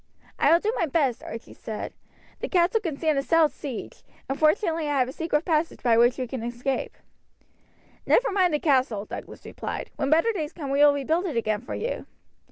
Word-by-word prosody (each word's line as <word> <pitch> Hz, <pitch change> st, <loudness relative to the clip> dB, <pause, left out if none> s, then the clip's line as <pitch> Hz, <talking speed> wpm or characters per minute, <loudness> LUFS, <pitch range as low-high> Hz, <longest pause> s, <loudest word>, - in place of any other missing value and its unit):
"I -, -, +4 dB
will 335 Hz, -, +6 dB
do 430 Hz, +5 st, -1 dB
my 335 Hz, -, 0 dB
best," 275 Hz, -5 st, +1 dB
Archie 230 Hz, -, -8 dB
said. 220 Hz, -1 st, -6 dB, 0.5 s
"The -, -, -4 dB
castle 365 Hz, +4 st, +3 dB
can 325 Hz, -8 st, -3 dB
stand 310 Hz, -3 st, +1 dB
a -, -, +1 dB
stout 320 Hz, +1 st, +3 dB
siege; 265 Hz, -3 st, -7 dB, 0.3 s
and 270 Hz, -, -3 dB
fortunately 320 Hz, -1 st, +2 dB
I 290 Hz, -, +1 dB
have 255 Hz, -2 st, +3 dB
a -, -, -5 dB
secret 315 Hz, +1 st, -1 dB
passage 325 Hz, -1 st, 0 dB
by 235 Hz, -2 st, +4 dB
which 240 Hz, +2 st, +4 dB
we 255 Hz, -, -2 dB
can 250 Hz, 0 st, -5 dB
escape." 240 Hz, +3 st, -3 dB, 1.1 s
"Never -, -, +4 dB
mind 370 Hz, -5 st, +3 dB
the -, -, 0 dB
castle," 255 Hz, -9 st, +1 dB
Douglas -, -, -9 dB
replied. -, -, -5 dB
"When 275 Hz, -2 st, -1 dB
better 330 Hz, +9 st, +4 dB
days 315 Hz, -5 st, -4 dB
come 285 Hz, -5 st, -5 dB
we 280 Hz, -, +1 dB
will 290 Hz, 0 st, +6 dB
rebuild 320 Hz, +7 st, 0 dB
it 295 Hz, -8 st, -3 dB
again 215 Hz, -2 st, 0 dB
for 245 Hz, -, -6 dB
you." 475 Hz, -, -4 dB
295 Hz, 205 wpm, -26 LUFS, 255-330 Hz, 1.1 s, will